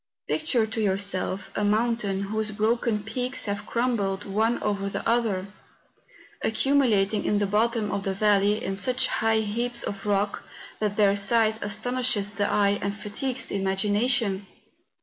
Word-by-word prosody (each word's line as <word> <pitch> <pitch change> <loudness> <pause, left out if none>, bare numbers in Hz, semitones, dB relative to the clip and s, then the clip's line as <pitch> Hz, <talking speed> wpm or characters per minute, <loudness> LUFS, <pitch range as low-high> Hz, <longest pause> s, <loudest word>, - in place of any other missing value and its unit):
Picture 285 -8 +1
to 220 +1 -3
yourself 195 -1 0
a - - -1
moun¬ 225 +3 +1
tain 195 -3 -2
whose 215 +2 -2
broken 215 0 0
peaks 250 +4 -3
have 205 0 -4
crumbled 210 -5 -1
one 220 +4 +1
over 200 -1 -1
the - - -4
other, 225 -5 +1 1.0
accumulating 220 -4 +2
in 210 - +1
the 205 - +1
bottom 215 +1 0
of 200 - -2
the 195 0 -2
valley 210 +2 +2
in 195 - -2
such 255 +6 +1
high 225 -2 +1
lumps 235 +3 -2
of 200 +1 -5
rock, 200 0 0 0.4
that 210 -1 -1
their 200 -2 +4
size 220 +2 +3
asto¬ 220 +4 -2
nishes 230 -5 +1
the 205 0 0
eye 200 -1 +2
and 200 +1 -3
fatigues 255 +5 -2
the - - -4
imagination. 205 +1 +1
210 Hz, 155 wpm, -25 LUFS, 200-230 Hz, 1.0 s, their